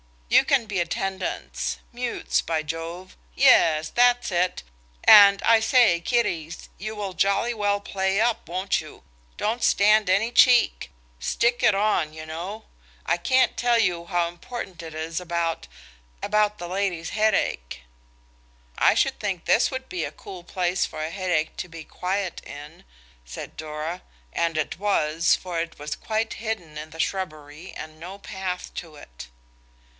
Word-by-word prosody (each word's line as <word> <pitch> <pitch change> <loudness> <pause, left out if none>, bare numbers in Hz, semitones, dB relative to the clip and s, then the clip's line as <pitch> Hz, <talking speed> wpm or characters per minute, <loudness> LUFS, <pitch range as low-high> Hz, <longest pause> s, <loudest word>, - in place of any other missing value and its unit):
You - - +6
can 265 -4 +2
be 205 -4 -2
attendants–mutes 195 +7 -3
by 160 -1 -2
Jove!–yes 160 - +1
that's 245 -1 +3
it. 180 - 0 0.4
And, 200 -1 +8
I 230 -1 +5
say, 220 -6 +4
kiddies, 170 -6 -2
you 215 +3 -5
will 200 -3 -4
jolly 200 +6 +1
well 205 -2 0
play 190 0 -1
up, 230 0 0
won't 185 +2 0
you? 155 -1 -13 0.3
Don't 225 +3 -1
stand 210 0 +4
any 205 +5 +2
cheek. 240 - +4 0.3
Stick 240 +1 +1
it 210 - +4
on, 195 -7 +1
you 155 0 -8
know. 175 +7 -6 0.4
I - - +1
can't 255 +7 +2
tell 240 -1 +3
you 175 -6 +1
how 175 -1 0
important 175 +1 -8
it 160 -1 -9
is 160 +1 -3
about–about 170 - -3
the 175 - -6
lady's 180 -3 -2
headache." 210 - 0 1.0
"I - - +5
should - - +1
think 190 -5 -3
this 230 - +3
would 260 -1 -6
be 360 - -3
a - - -7
cool 185 -3 -10
place 180 0 0
for 155 - -6
a 160 - -4
headache 180 -5 -1
to - - -4
be 165 -2 -10
quiet 185 +2 -3
in," 145 - -11 0.4
said - - -9
Dora; 155 +3 -5 0.3
and 165 -1 0
it 155 +2 -2
was, 165 -5 +2
for 180 -2 -5
it 165 0 -4
was 150 +1 -5
quite 220 0 -2
hidden 200 -9 -5
in 155 +1 -7
the 160 +1 -4
shrubbery 155 -3 -5
and 155 0 -9
no 180 +4 -8
path 190 -2 -5
to 165 -3 -7
it. - - -12
180 Hz, 150 wpm, -24 LUFS, 160-210 Hz, 1.0 s, And